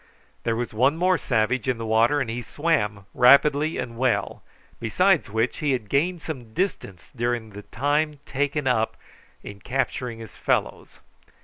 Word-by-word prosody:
There 115 - +1
was 120 -1 -3
one 130 +8 +2
more 180 0 +2
savage 120 0 0
in 125 - 0
the 115 - -5
water, 115 +6 +3
and 135 - -1
he 115 +2 -4
swam 110 - -1
rapidly 140 +5 +5
and 115 -1 -5
well, 130 -2 0 0.4
besides 175 - +2
which, 110 +3 -1
he 145 -3 +1
had 110 -5 -3
gained 165 +6 0
some 125 -8 -7
distance 100 - -3
during 120 -2 -2
the 105 +1 -9
time 145 +6 -1
taken 145 +1 -1
up 115 -4 +1 0.5
in 100 -1 -9
capturing 125 +1 -2
his 115 -1 -11
fellows. - - -2
125 Hz, 155 wpm, -24 LUFS, 115-145 Hz, 0.5 s, rapidly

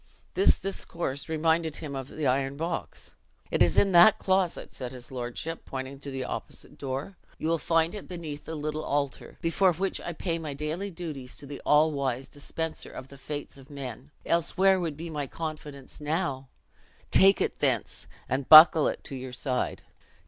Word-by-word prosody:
This 385 - +5
discourse 170 -7 -4
reminded 160 0 +1
him 145 -3 -6
of 135 -1 -5
the 155 +1 -5
iron 135 +1 +1
box. 165 +2 -4 0.4
'It - - 0
is 85 - +4
in 195 - +4
that 180 +5 +8
closet,' 190 -2 0
said 125 -1 -6
his 125 0 -9
lordship, 130 +6 -4
pointing 135 +1 -6
to 140 - -8
an 135 -1 -4
opposite - - -7
door; 140 +7 -4 0.2
you - - -3
will 165 0 +1
find 165 +2 +2
it 210 - -7
beneath 160 -5 -7
the 160 - -5
little 155 +1 -3
altar, 140 -2 -2
before 180 +2 +3
which 190 +4 -1
I 175 - -5
pay 165 0 -2
my 150 -3 -5
daily 155 +7 -3
duties 155 -8 -6
to 145 - -8
the 140 0 -8
allwise 140 -4 +2
Dispenser 160 +2 -5
of 130 - -9
the 140 - -12
fates 145 0 -6
of 135 +1 -15
men; 135 -2 -7 0.2
else 170 +1 0
where 190 0 +5
would 165 -5 -3
be 165 +1 -6
my 145 -3 -3
confidence 150 -3 -7
now? 150 -4 -2 0.6
Take 195 +1 +6
it - - -1
thence, - - -1 0.2
and 130 0 -2
buckle 155 0 +10
it - - -3
to 135 - -7
your 130 -1 -7
side." 125 0 -2
150 Hz, 180 wpm, -28 LUFS, 135-165 Hz, 0.6 s, buckle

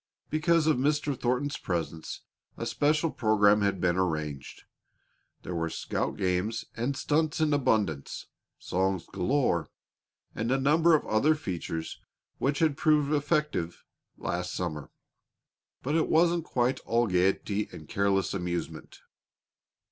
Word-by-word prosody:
Because 160 +1 +3
of 155 -4 +3
Mr. 145 +1 +1
Thornton's 125 +4 -1
presence, 80 -3 -4 0.4
a - - -4
special 155 +2 +1
program 105 -2 +3
had 100 -2 +1
been 90 0 +1
arranged. 75 -6 -3 0.8
There 90 - -5
were 80 -1 -1
scout - - -3
games 95 +4 -1
and 125 +4 -2
stunts 155 +2 0
in 155 -2 +2
abundance, 110 - 0 0.3
songs 95 -1 -1
galore, 95 - 0 0.6
and 115 +1 -2
a 135 - +3
number 160 +4 +4
of 150 - 0
other 145 +9 +3
features 85 - -5 0.4
which 140 +2 +1
had 155 -4 +2
proved 150 -1 +3
effective 150 - 0 0.3
last 90 0 -3
summer. 75 -5 -4 0.9
But 140 - -1
it 160 0 +2
wasn't 170 0 +3
quite 125 -1 0
all 120 +1 +1
gaiety 100 +2 +1
and 75 - -10
careless 100 +1 +1
amusement. 90 -2 -4
115 Hz, 125 wpm, -28 LUFS, 90-150 Hz, 0.9 s, number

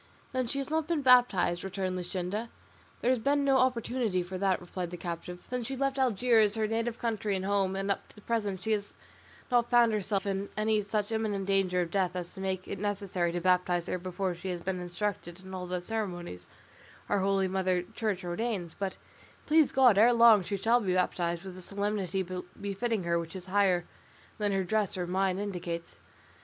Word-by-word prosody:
"Then 255 -2 -1
she 275 - -3
has 275 +1 -3
not 315 -1 0
been 330 -4 0
baptised?" 245 -9 +4
returned 190 -1 -2
Luscinda. 185 +5 -3 0.5
"There 245 - +3
has 255 - +2
been 280 +4 +2
no 270 -1 +4
opportunity 240 -6 +1
for 180 +2 -7
that," 195 -1 +2
replied 180 0 -5
the 175 - -7
captive, 175 +1 -6
"since 250 -2 -3
she 270 - -3
left 275 0 0
Algiers, 230 -3 +3
her 220 -1 +1
native 230 +1 -1
country 215 -4 -1
and 190 0 -3
home; 195 -1 +1
and 195 +1 -1
up 195 - -3
to - - -20
the 210 - -14
present 205 -5 -1
she 220 - -1
has 205 -1 -1 0.6
not 240 -1 +3
found 240 -2 +5
herself 205 -1 -1
in 195 0 -2
any 215 0 +2
such 210 +1 -2
imminent 215 -3 -1
danger 190 -2 +2
of 170 -2 -3
death 185 -2 0
as 175 -1 -5
to 190 - -8
make 190 -1 -2
it - - -5
necessary 195 -4 -1
to 175 - -2
baptise 180 -1 +2
her 185 - -2
before 185 +1 -2
she 175 +2 -6
has 180 -1 -2
been 185 +1 -2
instructed 180 0 -4
in 190 0 -10
all 180 -1 -4
the 180 0 -2
ceremonies 175 - -4 0.6
our 205 - +1
holy 195 0 +2
mother 185 -1 0
Church 200 0 -3
ordains; 180 -1 -2
but, 195 -2 -4 0.5
please 310 -1 +4
God, 250 -6 +5
ere 235 +3 +7
long 230 -3 +7
she 200 +3 -3
shall 230 +5 +3
be 185 -5 0
baptised 175 -1 0
with 190 -1 -7
the 185 - -9
solemnity 195 -1 -1 0.3
befitting 205 +1 -1
her 170 0 +1
which 165 +2 -7
is 185 -1 -7
higher 185 -2 +2 0.5
than 205 -1 +1
her 195 -1 +1
dress 205 +1 0
or 180 - -1
mine 185 +1 0
indicates." 175 -4 -4
195 Hz, 200 wpm, -30 LUFS, 180-225 Hz, 0.6 s, ere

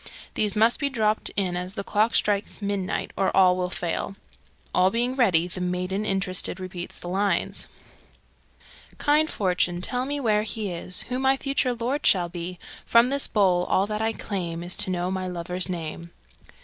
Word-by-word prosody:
These 210 -1 0
must 225 +3 +4
be 280 -2 +1
dropped 220 -4 0
in 185 -3 0
as 180 +2 -4
the 200 - -3
clock 215 +3 +1
strikes 205 0 +1
midnight, 200 -2 -2
or 195 - +2
all 185 -1 +6
will 180 0 -1
fail. 175 +2 -3 0.6
All 185 +1 +4
being 240 +5 0
ready, 185 -10 +3
the 180 +1 -6
maiden 180 +3 -1
interested 190 -1 -1
repeats 185 -1 -6
the - - -9
lines: 190 0 0 1.3
Kind 305 +1 +3
fortune, 180 -2 0
tell 250 +7 -2
me 290 +1 -2
where 215 -5 +2
is 205 -3 -3
he - - -16
Who 250 0 -1
my 265 0 +3
future 270 -2 0
lord 250 +6 -2
shall 175 -3 +4
be; 175 +1 -5 0.3
From 235 +2 +5
this 280 +1 +2
bowl 185 -4 +3
all 190 - +2
that 210 +1 -3
I 225 0 +1
claim 175 -6 -4
Is 175 +1 -2
to - - +2
know 180 0 -1
my 185 -1 -2
lover's 180 +1 -2
name. 170 -1 -5
195 Hz, 175 wpm, -25 LUFS, 180-225 Hz, 1.3 s, all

